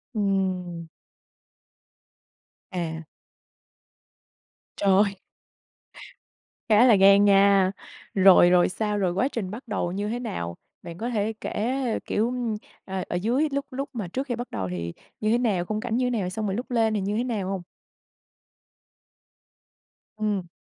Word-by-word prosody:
Ừm. 185 Hz, -4 st, -1 dB, 1.8 s
À. 165 Hz, -3 st, -4 dB, 1.7 s
Trời. 200 Hz, 0 st, +3 dB, 1.5 s
Khá 220 Hz, +3 st, +6 dB
là 230 Hz, -, +7 dB
gan 200 Hz, +1 st, +6 dB
nha. 195 Hz, -1 st, +5 dB, 0.4 s
Rồi, 190 Hz, -2 st, +7 dB
rồi 180 Hz, 0 st, +4 dB
sao? 210 Hz, +2 st, -2 dB
Rồi 185 Hz, -3 st, 0 dB
quá 195 Hz, +8 st, +1 dB
trình 220 Hz, -9 st, -4 dB
bắt 245 Hz, +5 st, -8 dB
đầu 200 Hz, -5 st, -2 dB
như 200 Hz, +3 st, -3 dB
thế 240 Hz, +2 st, -2 dB
nào? 85 Hz, -, -5 dB, 0.2 s
Bạn 170 Hz, 0 st, -9 dB
có 235 Hz, +6 st, -3 dB
thể 220 Hz, -2 st, -1 dB
kể, 230 Hz, +5 st, -2 dB, 0.3 s
kiểu, 230 Hz, +4 st, 0 dB, 0.5 s
ờ, 190 Hz, -1 st, -3 dB
ở -, -, -2 dB
dưới 240 Hz, -, +1 dB
lúc 280 Hz, 0 st, -2 dB
lúc 275 Hz, +2 st, -4 dB
mà 220 Hz, -7 st, -4 dB
trước 265 Hz, -, -4 dB
khi 245 Hz, -, -1 dB
bắt 245 Hz, +1 st, -6 dB
đầu 95 Hz, -2 st, -3 dB
thì 85 Hz, -1 st, -4 dB, 0.3 s
như 215 Hz, 0 st, +1 dB
thế 235 Hz, -, +4 dB
nào, 210 Hz, -8 st, 0 dB
khung 215 Hz, +3 st, -2 dB
cảnh 235 Hz, -1 st, -2 dB
như 255 Hz, -, +1 dB
thế -, -, +1 dB
nào, 180 Hz, -2 st, -2 dB
xong 215 Hz, +3 st, -4 dB
rồi 195 Hz, -2 st, -1 dB
lúc 245 Hz, +3 st, -5 dB
lên 225 Hz, -2 st, +2 dB
thì 210 Hz, -, 0 dB
như 205 Hz, +2 st, -1 dB
thế 235 Hz, -, +1 dB
nào 215 Hz, -7 st, -2 dB
hông? 195 Hz, -2 st, -3 dB, 2.6 s
Ừm. 205 Hz, -4 st, -1 dB
200 Hz, 150 wpm, -25 LUFS, 185-230 Hz, 2.6 s, là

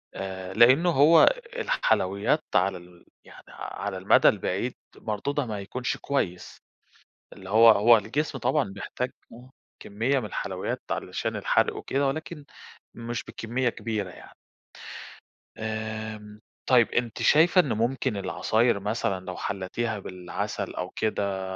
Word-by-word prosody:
آآ، 95 Hz, -1 st, -6 dB
لأنه 130 Hz, +10 st, +5 dB
هو 160 Hz, +1 st, +6 dB
ال -, -, +1 dB
الحلويات 110 Hz, -, +1 dB
على 95 Hz, +1 st, +2 dB
ال 90 Hz, 0 st, -17 dB, 0.2 s
يعني -, -, -15 dB
على 100 Hz, -2 st, -6 dB
المدى 95 Hz, +2 st, +5 dB
البعيد، 100 Hz, +4 st, -2 dB, 0.2 s
مردودها 135 Hz, +7 st, -2 dB
ما 105 Hz, -3 st, -4 dB
يكونش 120 Hz, +6 st, -3 dB
كويس. 90 Hz, -11 st, -3 dB, 0.8 s
اللي 95 Hz, -, -12 dB
هو 115 Hz, +3 st, +7 dB
هو 115 Hz, +2 st, +7 dB
الجسم 135 Hz, +8 st, -2 dB
طبعًا 130 Hz, 0 st, +1 dB
بيحتاج 125 Hz, +5 st, -4 dB, 0.2 s
آه، 125 Hz, +2 st, -13 dB, 0.3 s
كمية 115 Hz, +7 st, 0 dB
مِن 120 Hz, -, -5 dB
الحلويات 105 Hz, -, -4 dB
علشان -, -, -3 dB
الحرق -, -, +1 dB
وكده 140 Hz, +1 st, -1 dB
ولكن 150 Hz, +1 st, -5 dB, 0.5 s
مش 120 Hz, 0 st, -5 dB
بكمية 120 Hz, +2 st, -2 dB
كبيرة 110 Hz, -4 st, -4 dB
يعني. -, -, -14 dB, 1.2 s
آمم، 110 Hz, -1 st, -5 dB, 0.3 s
طيب 120 Hz, -3 st, +5 dB
أنتِ 120 Hz, -2 st, -2 dB
شايفة 170 Hz, +5 st, +5 dB
إن 145 Hz, -8 st, 0 dB
ممكن 120 Hz, +1 st, -1 dB
العصاير 110 Hz, +3 st, +1 dB
مثلًا 100 Hz, -2 st, -2 dB
لو 90 Hz, 0 st, -6 dB
حلتيها 100 Hz, +3 st, -3 dB
بالعسل 90 Hz, -2 st, -5 dB
أو 90 Hz, 0 st, -4 dB
كده 100 Hz, -3 st, -2 dB
110 Hz, 130 wpm, -26 LUFS, 100-130 Hz, 1.2 s, هو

